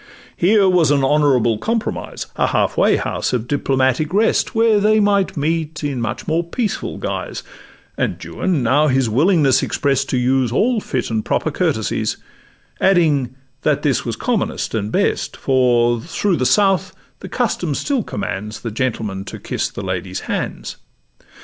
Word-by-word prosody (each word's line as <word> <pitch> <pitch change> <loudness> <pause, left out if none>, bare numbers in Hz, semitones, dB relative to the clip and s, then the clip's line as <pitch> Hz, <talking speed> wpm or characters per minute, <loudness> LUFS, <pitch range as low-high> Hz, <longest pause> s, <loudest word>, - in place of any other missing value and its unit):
Here 200 +2 +4
was 180 -5 +3
an 140 -2 +2
honourable 135 -6 +2
compromise, 225 0 -3
A - - +1
half - - 0
way - - +4
house - - -2
of 120 -1 -1
diplomatic 135 +1 +1
rest, 225 +2 +2
Where 225 -2 +4
they 215 +1 +3
might 200 -4 +1
meet 160 +1 -2
in 140 -4 -2
much 120 +2 -4
more 165 +2 +1
peaceful 210 +6 -3
guise; - - -4 0.6
And - - 0
Juan 175 -8 -2
now 145 +6 +3
his 130 -4 +1
willingness 145 - +3
exprest 135 -1 0
To 130 - 0
use 125 -1 +1
all 225 - +2
fit 125 -9 -3
and 110 -1 -1
proper - - -1
courtesies, - - -1 0.6
Adding, 150 -9 +2 0.3
that 150 -2 +1
this 135 -5 +1
was 115 -2 -3
commonest 225 - -2
and 105 -1 -2
best, - - 0
For 120 -3 +2
through 180 - -1
the 130 - +1
South 195 -2 +2 0.2
the - - -9
custom 180 - -1
still 275 - -1
commands 105 - -5
The 115 - -4
gentleman 110 -5 -2
to - - -7
kiss - - -3
the - - -7
lady's 95 0 -4
hands. - - -4
140 Hz, 155 wpm, -19 LUFS, 120-185 Hz, 0.6 s, Here